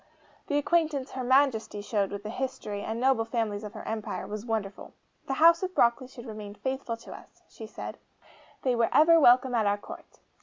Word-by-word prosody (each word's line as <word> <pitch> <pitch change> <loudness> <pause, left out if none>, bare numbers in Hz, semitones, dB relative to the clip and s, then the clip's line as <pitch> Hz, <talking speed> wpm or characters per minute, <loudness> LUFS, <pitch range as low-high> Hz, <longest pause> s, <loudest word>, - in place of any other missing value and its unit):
The 290 - 0
acquaintance 295 -3 0
HER 260 - -4
MAJESTY 245 -5 +2
showed 205 -2 0
with 200 0 -6
the 215 - -5
history, 235 -5 -4
and 220 +2 -4
noble 260 -2 +3
families 225 -3 -2
of 210 - -8
her - - -8
empire, 220 -1 -4
was 215 +2 -7
wonderful. 210 -3 -4 0.3
'The 270 - -1
House 335 +3 +6
of 370 -1 -4
Broccoli 235 +2 +2
should 250 -2 -12
remain 210 -3 -8
faithful 260 -1 -4
to 230 - -11
us,' - - -15
she 220 - -10
said; - - -8 0.6
'they 255 -2 +2
were 230 - +2
ever 330 +2 +6
welcome 250 -2 +5
at 220 -3 +2
our 200 0 +2
Court. - - -12
235 Hz, 195 wpm, -28 LUFS, 215-265 Hz, 0.6 s, House